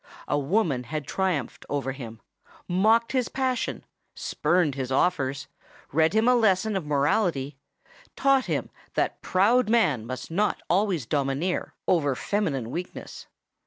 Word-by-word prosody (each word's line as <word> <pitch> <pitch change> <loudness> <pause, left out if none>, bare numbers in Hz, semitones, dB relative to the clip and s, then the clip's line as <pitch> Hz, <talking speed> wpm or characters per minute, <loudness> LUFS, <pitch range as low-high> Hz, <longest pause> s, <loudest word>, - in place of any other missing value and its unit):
A - - +1
woman 145 - 0
had 150 +3 -4
triumphed 180 -6 -2
over 140 -2 -1
him—mocked 180 - -1
his 255 -3 0
passion—spurned 185 - -1
his 130 -1 -4
offers—read 145 +1 -1
him 220 +2 +3
a 250 - +6
lesson 215 -3 +2
of 180 -6 -3
morality—taught 155 - 0
him - - -2 0.2
that - - 0
proud 215 +6 +3
man 155 - +2
must 130 +5 -6
not 205 +5 +1
always 185 - +1
domineer 140 +6 -1
over 145 -6 +2
feminine 140 - -1
weakness. 180 +4 -7
170 Hz, 115 wpm, -26 LUFS, 135-215 Hz, 0.2 s, a